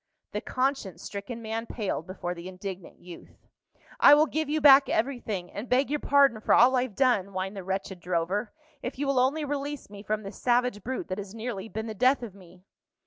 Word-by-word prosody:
The - - -3
conscience 255 - -2
stricken 225 +4 -6
man 225 +1 -4
paled 205 -8 -3
before 180 -1 -4
the 170 0 -9
indignant 185 0 -8
youth. 175 -1 -13 0.6
"I 290 - +9
will 300 +1 +5
give 315 0 -2
you 310 +1 +1
back 280 -1 +7
everything, 220 -7 -2
and 215 +5 -7
beg 260 +2 +2
your 295 - 0
pardon 275 -7 +3
for - - +4
all 255 +2 +6
I've 250 -4 -1
done," 245 -7 +2
whined 190 +1 -4
the 195 - -6
wretched 190 0 -4
drover, 180 +5 -1 0.3
"if 250 - -5
you 285 - -2
will 275 -2 +2
only 285 +5 +1
release 285 -4 -4
me 200 -1 -9
from 215 +1 -2
this 195 0 -9
savage 245 -4 +1
brute 260 +1 -4
that 185 +2 -3
has 200 +1 -8
nearly 225 -3 -5
been 220 +1 -4
the 220 - -5
death 255 +4 +2
of 220 -5 -7
me." 180 -2 -17
220 Hz, 205 wpm, -27 LUFS, 190-260 Hz, 0.6 s, I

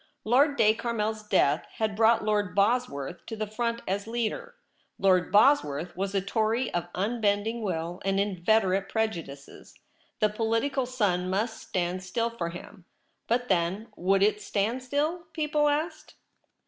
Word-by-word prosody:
Lord 280 +6 +3
de 215 -1 +5
Carmel's 220 -2 -2
death 175 -8 +2
had 215 -2 -1
brought 225 0 +4
Lord 205 -4 0
Bosworth 200 - 0
to 225 - -5
the 215 0 -2
front 230 +2 -3
as 200 +3 -2
leader. 240 - -3 0.4
Lord 185 -2 +3
Bosworth 180 - +3
was 195 +1 -3
a 195 - +2
Tory 220 +5 0
of 175 0 -1
unbending 215 +2 0
will 175 -3 -3
and 195 0 +1
inveterate 195 0 +1
prejudices; 170 -11 -4 0.4
the 215 - +4
political 230 +5 0
sun 195 -8 0
must 220 +4 -1
stand 180 0 -2
still 230 +5 -1
for 175 -8 -3
him; 175 +2 -11 0.4
but 245 +2 0
then, 185 +3 0
would 195 +2 +2
it 210 0 +2
stand 220 +5 -1
still? 300 +7 -1
people 300 -2 +1
asked. 310 +2 -3
215 Hz, 145 wpm, -27 LUFS, 185-235 Hz, 0.4 s, de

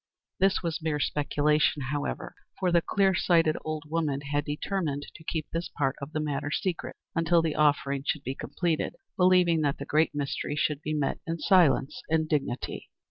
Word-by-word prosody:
This 190 0 +3
was 165 -2 -2
mere 155 -2 -1
speculation, 150 +1 +1
however, 145 -1 -3 0.2
for 185 -2 +1
the 170 0 +4
clear 195 +2 +2
sighted 165 -3 +3
old 155 -1 -3
woman 150 -3 -1
had 145 0 -1
determined 150 -1 -2
to 160 - -13
keep 160 -1 -3
this 165 0 -3
part 135 -2 +1
of 140 +2 -6
the 155 - -2
matter 145 -1 -2
secret 175 +3 -2 0.2
until 165 0 +3
the 160 -2 0
offering 140 -2 +2
should 140 0 -1
be 130 - -3
completed, 165 +3 -2 0.2
believing 180 -3 +4
that 145 -2 +1
the - - -6
"Great 155 0 +2
Mystery" 145 0 -2
should 150 -1 0
be 155 0 -2
met 145 -2 -1
in 165 0 -1
silence 165 -7 +3
and 160 0 +2
dignity. 140 -5 -2
155 Hz, 180 wpm, -28 LUFS, 145-165 Hz, 0.2 s, the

